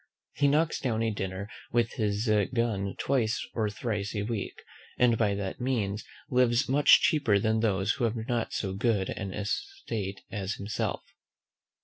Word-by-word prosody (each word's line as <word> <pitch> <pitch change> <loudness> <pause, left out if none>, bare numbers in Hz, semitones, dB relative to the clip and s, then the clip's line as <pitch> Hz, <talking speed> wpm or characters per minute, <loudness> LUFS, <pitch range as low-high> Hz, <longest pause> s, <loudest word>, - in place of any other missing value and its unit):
He 145 - +2
knocks 155 +3 +2
down 115 -4 0
a 115 - +1
dinner 95 -1 -4 0.2
with 120 -1 +2
his 105 -1 -1 0.3
gun 105 -5 0
twice 120 -5 +1
or 110 -2 0
thrice 105 -1 -3
a 100 - -1
week; 105 -1 -4 0.3
and 125 -2 +4
by 105 -3 +1
that 100 +3 -4
means 105 -6 -1 0.3
lives 125 0 +3
much 140 +3 +6
cheaper 135 -10 +3
than 110 +2 +1
those 105 -2 +1
who 120 - 0
have 115 0 0
not 120 -2 -1
so 95 -2 -2
good 100 -2 +1
an 100 - -4
estate 105 - -4
as 100 -1 -3
himself. 100 +1 -3
110 Hz, 155 wpm, -29 LUFS, 100-120 Hz, 0.3 s, much